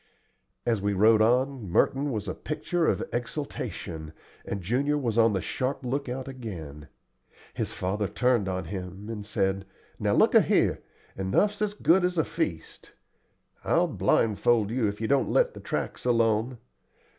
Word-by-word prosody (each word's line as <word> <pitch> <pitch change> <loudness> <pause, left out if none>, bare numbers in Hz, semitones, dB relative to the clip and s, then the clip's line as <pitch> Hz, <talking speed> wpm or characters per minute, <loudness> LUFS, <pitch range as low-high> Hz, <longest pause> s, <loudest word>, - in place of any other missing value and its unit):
As 115 -4 +1
we 100 0 0
rode 110 +3 +5
on, 125 -1 +1
Merton 135 +10 +2
was 105 -3 -3
a 95 - -2
picture 165 +2 -2
of - - +1
exultation, 105 - -5 0.3
and 100 -2 -5
Junior 135 +9 +1
was 120 -6 -1
on 115 -2 +4
the 95 -4 -1
sharp 130 0 -2
lookout 130 0 -3
again. 85 - -8 0.7
His - - -3
father 100 +3 -2
turned 125 -4 +1
on 95 -1 -3
him 95 +3 -7
and 110 -2 -5
said: 95 -2 -1 0.4
"Now - - +1
look - - +4
a' - - +8
here, - - +2 0.3
enough's 200 - +1
as 210 -1 0
good 185 -2 +3
as 180 0 0
a 160 - +3
feast. 90 - -4 0.7
I'll - - +3
blindfold 110 0 +2
you 120 -2 +1
if 100 0 -4
you 110 - -1
don't 140 +1 +2
let - - +3
the - - -9
tracks - - -4
alone. 115 0 +2
115 Hz, 155 wpm, -27 LUFS, 100-135 Hz, 0.7 s, a